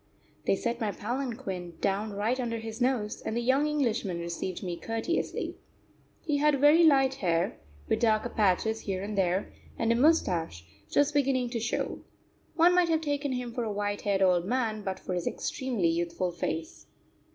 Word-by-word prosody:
They - - +4
set 235 +4 -2
my 215 -2 0
palanquin 225 -7 -4
down 200 +2 -1
right 220 +6 0
under 235 -2 -2
his 225 +1 -7
nose, 245 -5 0
and 220 - -3
the - - +2
young 265 +5 +2
Englishman 235 - 0
received 170 +2 -4
me 175 -2 -3
courteously. 225 - -2 0.7
He 300 -3 +1
had 295 -1 +3
very 295 +4 +6
light 270 -4 +5
hair, 180 -7 0 0.3
with - - +1
darker 220 0 +2
patches 220 +1 +1
here 190 -3 -3
and 210 +1 -4
there, 190 0 0 0.2
and 230 0 +1
a - - +3
moustache 180 - +2 0.2
just 290 +1 +2
beginning 260 -4 +1
to 235 - -1
show. 225 - -2 0.6
One 345 +2 +5
might 355 -1 +4
have 320 -1 +2
taken 285 -2 -1
him 250 -2 -4
for 240 - -2
a 220 - -2
white 205 0 -2
haired 195 -2 +1
old 180 -2 +3
man 225 -1 -1
but 190 -2 -3
for 185 - -5
his 175 -1 -2
extremely 245 -11 -1
youthful 170 +2 -1
face. 165 -1 -4
225 Hz, 175 wpm, -29 LUFS, 190-265 Hz, 0.7 s, very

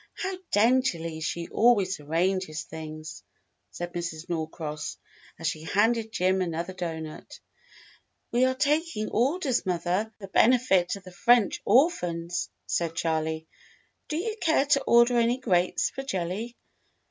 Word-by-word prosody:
How 380 -1 -3 0.2
daintily 205 -8 +2
she 170 +1 -3
always 205 -6 +3
arranges 165 +2 -1
things," 155 0 -8 0.5
said 175 +9 -6
Mrs. 170 -1 -5
Norcross, 160 -2 -4 0.4
as - - -8
she 155 - -1
handed 220 +6 +1
Jim 185 -2 +1
another 170 +1 -3
doughnut. 160 -3 -6 0.9
"We 245 +2 +3
are 260 0 +1
taking 295 -4 0
orders, 270 +1 +1
mother, 180 +4 -1
for 200 - -8
the 190 - -15
benefit 220 -7 +4
of 200 - -11
the 185 - -11
French 235 +4 +3
orphans," 180 - +2 0.2
said 165 -1 -1
Charley. 160 -1 -1 0.6
"Do 305 - -2
you 430 +6 -3
care 320 -4 +3
to 280 -1 +3
order 235 +1 +5
any 235 +1 +2
grapes 185 -8 +1
for 270 - -5
jelly 205 0 -4
190 Hz, 135 wpm, -27 LUFS, 165-240 Hz, 0.9 s, order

